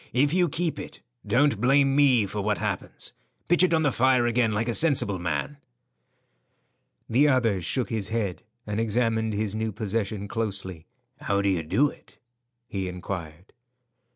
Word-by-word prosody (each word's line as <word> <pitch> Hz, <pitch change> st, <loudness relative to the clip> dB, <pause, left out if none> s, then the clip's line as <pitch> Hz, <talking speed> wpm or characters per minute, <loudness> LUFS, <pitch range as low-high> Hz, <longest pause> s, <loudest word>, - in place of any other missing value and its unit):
If 145 Hz, +4 st, +2 dB
you 180 Hz, -2 st, +3 dB
keep 165 Hz, +2 st, -2 dB
it, -, -, -9 dB, 0.3 s
don't 140 Hz, -4 st, +2 dB
blame 135 Hz, +2 st, +4 dB
me 130 Hz, -7 st, +4 dB
for 100 Hz, +2 st, -4 dB
what 105 Hz, 0 st, 0 dB
happens. -, -, -4 dB, 0.3 s
Pitch 175 Hz, 0 st, +3 dB
it 185 Hz, -, +4 dB
on 160 Hz, -1 st, +2 dB
the 145 Hz, -, +2 dB
fire 130 Hz, 0 st, +3 dB
again 120 Hz, -1 st, +2 dB
like 105 Hz, +2 st, -1 dB
a 120 Hz, -, 0 dB
sensible 130 Hz, -, +2 dB
man." 90 Hz, +11 st, -3 dB, 1.5 s
The 135 Hz, +6 st, +4 dB
other 115 Hz, -8 st, +2 dB
shook 125 Hz, +9 st, -1 dB
his 110 Hz, -4 st, -1 dB
head 105 Hz, -5 st, -2 dB, 0.2 s
and 105 Hz, 0 st, -3 dB
examined 110 Hz, 0 st, 0 dB
his 105 Hz, -1 st, -1 dB
new 110 Hz, 0 st, -2 dB
possession 105 Hz, -1 st, -3 dB
closely. 100 Hz, -6 st, -4 dB, 0.3 s
"How 100 Hz, 0 st, 0 dB
do 100 Hz, -, +2 dB
you 90 Hz, -4 st, +1 dB
do 135 Hz, -, +2 dB
it?" -, -, -20 dB, 0.5 s
he 95 Hz, -4 st, -3 dB
inquired. 90 Hz, -1 st, -7 dB
110 Hz, 160 wpm, -26 LUFS, 100-130 Hz, 1.5 s, blame